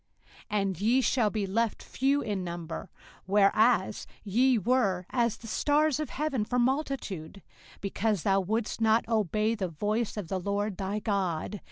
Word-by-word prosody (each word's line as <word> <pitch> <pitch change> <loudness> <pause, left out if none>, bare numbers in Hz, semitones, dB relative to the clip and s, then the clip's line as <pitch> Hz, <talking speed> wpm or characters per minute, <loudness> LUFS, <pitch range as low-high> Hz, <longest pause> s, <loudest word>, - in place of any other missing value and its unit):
05:028:062 210 -1 +1
And 195 -2 -2
ye 240 +5 +3
shall 240 -4 +2
be 210 -1 -2
left 220 +3 -1
few 275 +2 +1
in 205 -4 -2
number, 170 0 -6 0.4
whereas 210 +2 +3 0.2
ye 240 +5 +3
were 200 -5 +1
as 235 -3 +1
the - - -14
stars 295 +4 +2
of 305 - -3
heaven 275 -6 -1
for 245 +4 -2
multitude; 240 - -2 0.4
because 200 -1 -1
thou 195 -1 +3
wouldest 215 +4 -2
not 220 +1 +3
obey 215 0 +1
the 200 -5 -2
voice 210 +7 -2
of 205 -5 -4
the 190 +2 -2
LORD 200 +1 -2
thy 195 +1 -2
God. 200 -2 -2
210 Hz, 160 wpm, -29 LUFS, 195-240 Hz, 0.4 s, ye